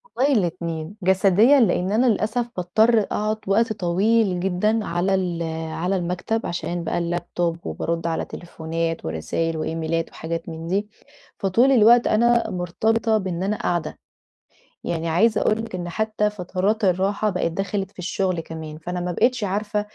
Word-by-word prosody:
والله 280 +3 +3
الاتنين، 170 -4 -2
جسديًا 195 +8 +5
لإن 185 -4 +2
أنا 230 +5 +3
للأسف 230 +1 +1
باضطر 215 +6 +3
أقعُد 215 +1 -1
وقت 220 +3 +2
طويل 195 +1 +1
جدًا 195 +4 0
على 180 +3 0
ال 180 -3 -1 0.3
على 180 +4 -1
المكتب 180 +5 -2
عشان 175 0 -3
بقى - - -2
اللاب 175 0 -3
توب 170 -1 0
وبارُد 170 0 -2
على 165 - -1
تليفونات 165 -1 -4
ورسايل 80 - -2
وإيميلات 160 +1 -2
وحاجات 165 +1 -5
من 165 0 -7
دي، 200 +4 0 0.5
فطول 230 +8 +3
الوقت 240 -1 +6
أنا 235 +2 +3
مرتبطة 220 +5 0
بإن 185 -2 -3
أنا 210 +2 0
قاعدة. 170 -5 -2 0.9
يعني 165 0 -2
عايزة 215 +7 +3
أقول 215 - +2
لِك 225 - -10
إن 175 -1 -4
حتّى 215 +2 0
فترات 200 +3 -1
الراحة 195 +3 +1
بقيت 180 -3 -1
دخلت 195 +1 -2
في - - -32
الشُغل 185 0 -1
كمان، 160 -1 -8
فأنا 180 +3 -4
ما 175 0 -2
بقيتش 245 +4 +1
عارفة 210 +2 -1
185 Hz, 155 wpm, -23 LUFS, 170-215 Hz, 0.9 s, الوقت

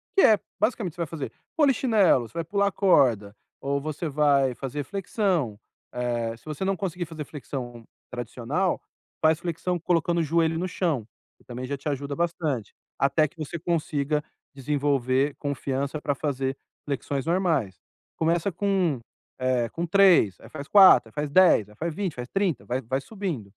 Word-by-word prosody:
que 390 - +6
é, 215 -2 +7 0.2
basicamente, 210 -6 0
você - - -18
vai 165 - -1
fazer 150 -4 -5 0.3
polichinelo, 225 - +3
você - - -25
vai 165 - -1
pular 200 +3 +1
corda, 120 - +3 0.3
ou 140 +1 0
você 155 +2 -4
vai 140 -3 +3
fazer 140 +3 -4
flexão. 185 - -1 0.4
Eh, 120 -2 -2
se - - -26
você 155 +5 -4
não 195 - +1
conseguir 180 -2 -3
fazer 155 -2 -7
flexão 125 -5 -7 0.3
tradicional, 125 +9 -2 0.4
faz 160 0 +4
flexão 175 +1 -2
colocando 170 0 +1
o 165 - +2
joelho 165 +1 +1
no 185 - -1
chão, 155 - -1 0.3
que - - -26
também 125 +1 -6
já 140 - -3
te 145 - -4
ajuda 140 0 -3
bastante, 160 - -2 0.3
até 150 +3 +3
que 155 - -24
você 160 +2 -5
consiga 150 -3 -1 0.3
desenvolver 140 -1 0
confiança 140 0 -3
para 145 - 0
fazer 135 -2 -2 0.3
flexões 140 -1 -3
normais. 165 - 0 0.4
Começa 170 +4 +1
com, 185 -7 0 0.4
eh, 130 -2 +1
com 170 +8 -3
3, 180 - +5
aí - - -12
faz 140 +2 -8
4, 185 - +7
aí - - -24
faz 150 -1 -2
10, 170 - +5
aí 105 - -17
faz 160 +6 -4
20, 190 -6 -2
faz 125 0 -6
30, 195 - -1
vai 125 +2 -2
vai 130 +3 -2
subindo. 190 - -4
150 Hz, 170 wpm, -26 LUFS, 130-175 Hz, 0.4 s, é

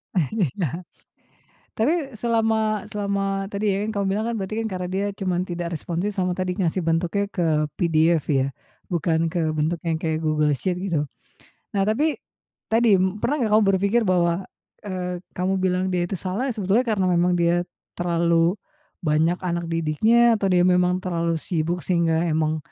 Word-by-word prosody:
Iya. 175 - -1 0.9
Tapi 250 +9 +3 0.3
selama 220 -2 +1
selama 195 -1 -1
tadi 205 0 0
ya, 195 - 0
kamu 200 -1 -1
bilang 215 +3 -1
kan 235 - -2
berarti 195 +2 -4
kan - - -1
karena 180 -1 -3
dia 195 +2 -1 0.2
cuman 180 -2 0
tidak 175 -1 -4
responsif 175 +6 -2
sama 180 -1 +1
tadi 185 -1 -3
ngasih 180 -1 0
bentuknya 170 +5 0
ke 180 -4 -1 0.3
PDF 165 -1 +3
ya, 135 -2 +2 0.4
bukan 165 -1 +1
ke 170 - -1
bentuknya 160 +3 -1
yang 160 - -3
kayak 160 -1 0
Google 150 -1 +2
Sheet 180 +5 -2
gitu. 150 -3 0 0.7
Nah 195 - +3
tapi 285 +10 +1 0.6
tadi 225 -3 +5 0.3
pernah 285 +5 +1
gak 210 - -1
kamu 215 +1 +5
berpikir 200 +5 +2
bahwa, 175 0 +1 0.4
eee, 180 -3 -4 0.2
kamu 185 +1 0
bilang 185 0 +1
dia 175 -1 0
itu 195 - -3
salah, 195 +9 -2
ya - - -2
sebetulnya 210 +4 +1
karena 205 -4 +1
memang 175 +1 +3
dia 170 0 +2 0.4
terlalu 170 +1 +2 0.5
banyak 160 +3 +2
anak 170 -1 -2
didiknya, 190 +9 +3
atau 195 - +1
dia 180 -1 +4
memang 180 0 +3
terlalu 170 -2 0
sibuk 170 +1 -2
sehingga 170 -2 +2
emang, 155 -1 +1
180 Hz, 160 wpm, -23 LUFS, 170-200 Hz, 0.9 s, tadi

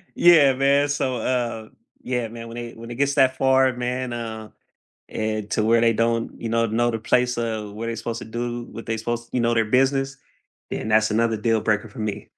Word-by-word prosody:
Yeah, 155 -6 +6
man. 140 +2 +2
So, 130 -3 -1
uh, 115 -2 -2 0.3
yeah, 125 -2 -2
man, 115 +1 -9
when 115 +1 -9
it 120 -1 -7
when 115 +1 -9
it 120 - -6
gets 140 +2 +1
that 130 -1 +3
far, 130 0 +4
man, 125 0 -3
uh, 110 -2 -6 0.6
and 110 -1 -3
to 105 - +1
where 115 +1 +4
they 115 -1 +4
don't, 115 +1 -1
you 115 - -3
know, 115 0 +2
know 120 +2 +1
the 115 - -1
place 125 +2 +1
of 110 -3 -3
where 115 +2 -5
they're 115 - -2
supposed 115 0 -4
to - - -8
do, 120 +1 -4
what 115 - -8
they 115 0 -2
supposed 120 +1 -4
you 125 - 0
know, 120 0 +2
their 115 -1 +2
business, 135 +3 +1 0.5
then 110 - -4
that's 110 0 +3
another 115 +1 +1
deal 110 +1 +1
breaker 110 +1 0
for 105 - -10
me. 105 -2 -4
115 Hz, 220 wpm, -23 LUFS, 110-125 Hz, 0.6 s, Yeah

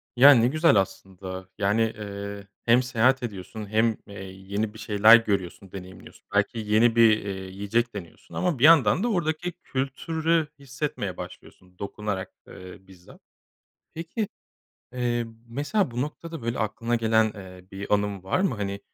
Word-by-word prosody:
Ya, 140 +4 +9
ne 120 -1 +4
güzel 155 -2 +3
aslında, 95 -1 -3
yani, 105 +2 +2
eee, 100 -2 -4 0.2
hem 120 +2 +5
seyahat 125 +1 +2
ediyorsun 105 0 -6
hem, 110 +1 +2
eee, 100 - -11
yeni 100 +3 -4
bir 110 - -12
şeyler 105 +2 +7
görüyorsun, 100 -3 -3
deneyimliyorsun. 95 -1 -11
Belki 105 +3 +1
yeni 110 +2 +3
bir, 115 -2 +6
eee, - - -3 0.2
yiyecek 105 +5 -1
deniyorsun 85 -5 -10
ama 175 -8 0
bir - - -1
yandan 155 - +6
da - - +1
oradaki 175 -1 -1
kültürü 160 +4 -1
hissetmeye 135 - -4
başlıyorsun. 90 -1 -11
Dokunarak, 100 -1 -4 0.2
eee, 90 0 -11
bizzat. 90 -2 -17 0.7
Peki, 170 +6 -3 0.7
eee, 120 -1 -1 0.2
mesela 145 - -1
bu 120 +1 -2
noktada, 160 +1 -6
böyle, 115 +1 -3
aklına 115 +2 -1
gelen, 110 -1 +2
eee, 90 -2 -11
bir 100 +2 -3
anın 100 -2 0
var 95 - 0
mı? 190 - +1
Hani, 100 -1 -4
110 Hz, 150 wpm, -26 LUFS, 100-130 Hz, 0.7 s, Ya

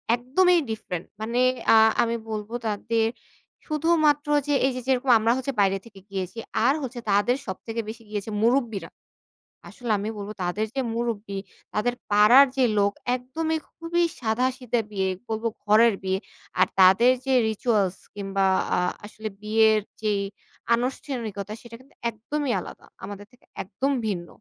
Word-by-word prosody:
একদমই 345 +9 +3
ডিফারেন্ট। 195 -6 -4 0.2
মানে 235 +3 -1 0.3
অ্যা 225 - +7 0.3
আমি 230 0 -1
বলবো 215 +1 -5
তাদের 225 +2 0 0.6
শুধুমাত্র 305 -2 +2 0.2
যে, 290 - +2
এইযে 255 -1 -3
যেরকম 260 0 +1
আমরা 225 +2 +2
হচ্ছে 260 +1 -3
বাইরে 195 0 +3
থেকে 210 -4 -14
গিয়েছি, 190 +2 -4 0.3
আর 270 - +5
হচ্ছে 250 -1 -5
তাদের 205 +5 +3
সবথেকে 225 +4 -4
বেশি 225 +1 -8
গিয়েছে 210 0 -4
মুরুব্বিরা। 230 -8 +1 0.8
আসলে 245 -3 -5
আমি 210 +2 -3
বলবো 205 +1 -6
তাদের 200 +5 -1
যে 270 - +1
মুরুব্বি, 220 -4 -3 0.4
তাদের 245 +3 +1 0.2
পাড়ার 215 +7 +8
যে 260 - +4
লোক 200 0 +3 0.2
একদমই 315 +6 -2
খুবই 345 +1 -1 0.2
সাদাসিধা 250 +1 0
বিয়ে 190 -2 0 0.2
বলব। 220 0 -3 0.2
ঘরের 220 +2 +5
বিয়ে। 190 0 0 0.4
আর - - +5
তাদের 190 +7 +7
যে 265 - +1 0.2
রিচুয়ালস 210 -4 0 0.2
কিংবা 195 -1 -1 0.2
অ্যা - - +1 0.2
আসলে 215 +1 -6
বিয়ের 220 0 +4 0.2
যেই 210 -2 +1 0.5
আনুষ্ঠানিকতা 235 -5 -3
সেটা 235 -1 -11
কিন্তু 265 +2 -22
একদমই 255 +5 -3
আলাদা। - - -10 0.2
আমাদের 205 0 -7
থেকে 245 - -25 0.2
একদম 225 +9 -2 0.2
ভিন্ন। 175 -4 -3
225 Hz, 145 wpm, -25 LUFS, 205-255 Hz, 0.8 s, পাড়ার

